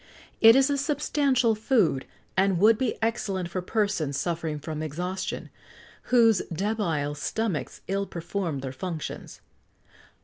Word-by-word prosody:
It 225 +1 +9
is 270 +1 +4
a 280 - +1
substantial 280 -4 +2
food, 215 - +1 0.3
and 190 -1 +3
would 215 +4 +5
be 255 -3 0
excellent 195 -6 -1
for 185 - -2
persons 180 -8 -1
suffering 165 -3 -2
from 155 +1 -5
exhaustion, 175 +5 -4 0.5
whose 230 -5 +4
debile 170 -6 -1
stomachs 185 +1 -3
ill 195 +1 -1
perform 170 -4 -3
their 130 -1 -5
functions. 165 +2 -6
195 Hz, 125 wpm, -26 LUFS, 160-225 Hz, 0.5 s, It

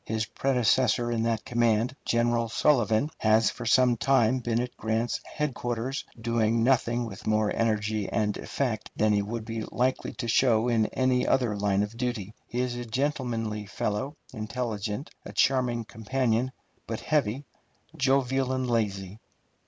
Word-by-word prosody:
His 110 -1 -1
predecessor 125 -2 +2
in 115 -1 0
that 115 -1 -1
command, 120 +1 +1
General 115 0 +1
Sullivan, 120 +1 +2
has 110 +1 +4
for 120 -2 -7
some 125 0 +4
time 130 -1 +3
been 120 -1 0
at 125 +1 -3
Grant's 110 +2 -1
headquarters, 130 -3 -3
doing 115 0 +1
nothing 120 -1 +2
with 100 -3 -9
more 110 -1 +2
energy 110 -2 0
and 105 -2 0
effect 120 -6 -3
than 110 0 +3
he 100 - +3
would 110 +2 -4
be 115 0 -4
likely 130 +2 -1
to 120 - -5
show 115 -1 +3
in 110 -2 +2
any 130 -1 +1
other 120 -5 +2
line 100 0 +1
of 105 +2 -5
duty. 120 -5 -3
He 125 - -2
is 125 -1 -2
a 120 - -4
gentlemanly 115 -4 -2
fellow, 105 +8 -2 0.2
intelligent, 110 +1 -4
a - - -9
charming 125 -3 +2
companion, 120 +2 -1 0.4
but 110 -1 -4
heavy, 140 -3 0 0.5
jovial, 135 -1 +1
and 130 -1 -1
lazy. 105 -4 -1
115 Hz, 150 wpm, -27 LUFS, 110-125 Hz, 0.5 s, has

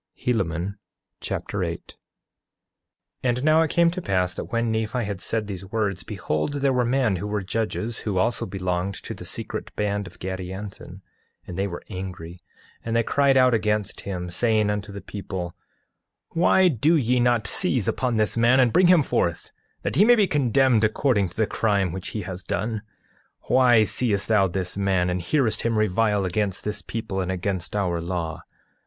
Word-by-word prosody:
Helaman 100 -4 -1 0.4
Chapter - - -3
8 - - -5
8:1 - - -44 1.3
And 125 +2 0
now 155 +1 +5
it 160 - +1
came 170 +1 +3
to 185 +1 -5
pass 90 - 0
that - - -5
when 115 -1 0
Nephi 110 +2 -1
had 100 -3 -4
said 110 -2 -1
these 95 -3 -6
words, 105 -5 -1
behold, 90 - -3
there 140 -1 +1
were 125 -1 +2
men 120 -5 +1
who 105 - -4
were 105 -1 -2
judges, 110 +3 -2
who 100 -4 -2
also 115 +6 +1
belonged 90 0 -2
to - - -7
the - - -9
secret - - -4
band 100 -1 -1
of 85 - -14
Gadianton, 95 +2 -7 0.4
and 90 - -7
they 100 +2 -1
were 85 -3 -7
angry, 90 -3 -7 0.4
and 115 0 -2
they 115 - +3
cried 140 +2 +3
out 130 -1 +5
against 105 -2 0
him, 90 -3 -5
saying 110 +1 +2
unto 105 0 -4
the 100 0 -7
people: 95 -4 -6 0.8
Why 180 +2 +4
do 155 +2 +3
ye 125 -4 +2
not 120 -3 +2
seize 105 +1 +3
upon 125 -3 0
this 110 -1 +2
man 120 +3 +4
and 125 -3 +4
bring 180 0 +5
him 175 -4 +6
forth, 85 -9 -1 0.3
that - - -2
he 200 - +7
may 240 +3 +7
be 215 -3 +4
condemned 130 - +3
according 110 - +2
to 90 - -16
the 110 - +3
crime 100 -4 0
which 95 +1 -5
he 105 - -4
has 90 0 -6
done? 110 +4 -2 0.6
8:2 - - -24
Why 125 -3 +6
seest 105 -3 0
thou 105 -3 +4
this 90 0 -2
man, 95 -3 +1
and 90 0 -1
hearest 110 - +1
him 115 -1 0
revile 105 -1 +2
against 100 +1 -1
this 105 0 -2
people 110 -4 -4
and 95 0 -2
against 95 0 -3
our 90 -5 0
law? 85 -2 -3
105 Hz, 185 wpm, -24 LUFS, 95-120 Hz, 1.3 s, he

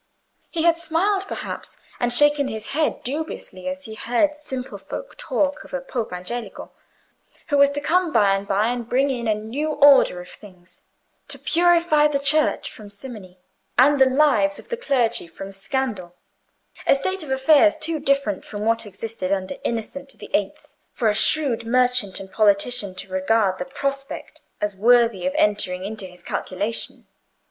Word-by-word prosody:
He 325 -2 -2
had 335 0 +4
smiled, 380 +4 0
perhaps, - - -6 0.2
and 245 0 0
shaken 295 +2 +4
his 220 -3 -5
head 305 +1 -1
dubiously, 275 - -5
as 280 0 -6
he 220 - -8
heard 245 +7 +1
simple 265 -4 -6
folk - - -7
talk 285 -1 -1
of - - -7
a - - -1
Pope 250 -4 -4
Angelico, 185 +7 -6 0.8
who 285 - +2
was 280 0 +7
to 285 +1 -4
come 350 +3 +1
by 200 -6 +4
and 195 0 -2
by 205 +3 +2
and 240 -1 -4
bring 270 +3 +2
in 240 -3 -3
a 215 - +2
new 235 +9 -3
order 285 -10 +5
of 180 - -9
things, 185 -3 -14 0.5
to - - -6
purify 335 -3 +3
the 295 -1 0
Church 295 +2 +1
from 210 -2 -12
simony, 200 -3 -10 0.4
and 280 +2 +5
the 265 - +7
lives 255 -9 +3
of - - -11
the 475 - -1
clergy 250 - 0
from 195 +3 -9
scandal—a 195 -1 -4
state 375 +8 -2
of 305 - -7
affairs 295 +4 +4
too 320 0 -1
different 275 -8 0
from 210 0 -6
what 225 -1 +1
existed 200 -1 -5
under 195 +6 -2
Innocent 230 +4 -4
the - - -11
Eighth - - -2 0.2
for 225 - +1
a - - +2
shrewd 265 0 +1
merchant 250 -4 +1
and 190 0 -10
politician 205 -1 +2
to 185 +1 -8
regard 190 0 +1
the - - -3
prospect 275 0 -5 0.2
as 210 -1 -2
worthy 230 -3 +3
of 185 - -1
entering 190 -3 0
into 205 -2 -5
his 180 0 -16
calculations. 205 +5 -3
245 Hz, 170 wpm, -22 LUFS, 205-285 Hz, 0.8 s, was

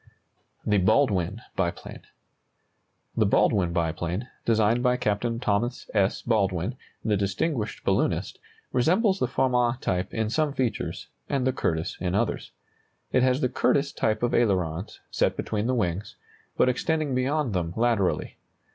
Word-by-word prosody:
THE 105 -1 +3
BALDWIN 105 -1 +2
BIPLANE. 85 -3 -3 1.1
The - - +3
Baldwin 90 -4 +3
biplane, 85 +5 -2 0.2
designed 110 +1 +3
by 125 0 +2
Captain 115 0 -1
Thomas 120 +2 -1
S. 100 -2 +1
Baldwin, 100 -1 0 0.3
the 105 -2 +2
distinguished 105 - -1
balloonist, - - 0 0.3
resembles 190 - +3
the 125 - +1
Farman 125 -1 +1
type 90 -5 -1
in 110 -1 -1
some 155 +1 +1
features, 130 -4 -2 0.2
and 135 -3 0
the 130 - +2
Curtiss 80 -9 -1
in 90 0 -1
others. - - -1 0.6
It 130 - +3
has 130 +2 +2
the 125 - +3
Curtiss 140 +2 +1
type 110 +1 0
of 120 - +1
ailerons, 95 -5 0
set - - +1
between 110 +1 -2
the 130 - +1
wings, 95 -3 -2 0.4
but - - +4
extending 150 +3 0
beyond 130 -1 0
them 85 -3 -1
laterally. 115 -5 +1
115 Hz, 140 wpm, -26 LUFS, 95-125 Hz, 1.1 s, but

